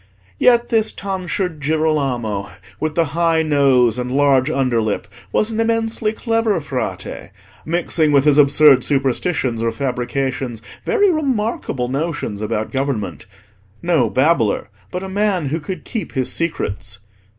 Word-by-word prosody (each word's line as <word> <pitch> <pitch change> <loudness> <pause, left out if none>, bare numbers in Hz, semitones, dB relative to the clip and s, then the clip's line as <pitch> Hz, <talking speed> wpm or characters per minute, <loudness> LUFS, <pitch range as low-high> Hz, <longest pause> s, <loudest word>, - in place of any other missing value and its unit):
Yet 240 -1 +4
this 220 -1 +2
tonsured 185 -4 -3
Girolamo 140 -10 0 0.3
with 155 0 -2
the 170 - +3
high 165 -1 +2
nose 135 -6 +3
and 125 0 -3
large 135 0 +3
under 130 -6 +1
lip 105 -2 -2 0.2
was 215 - +1
an 220 - -3
immensely 225 -1 0
clever 225 -3 0
Frate, 140 -4 -5 0.4
mixing 165 -2 +1
with 140 -1 +4
his 150 -1 +5
absurd 140 -2 +6
superstitions 135 -2 0
or 115 0 +1
fabrications 125 0 -2 0.3
very 410 -5 +3
remarkable 230 - -1
notions 135 -6 -3
about 110 0 -2
government: 135 -9 -3 0.6
no 170 -7 +2
babbler, 130 -8 +1 0.2
but 180 - -4
a - - -4
man 190 -6 0
who 160 +4 -1
could 185 +4 -6
keep 225 -4 -5
his 130 -2 -1
secrets. 100 - -3
145 Hz, 135 wpm, -19 LUFS, 125-185 Hz, 0.6 s, absurd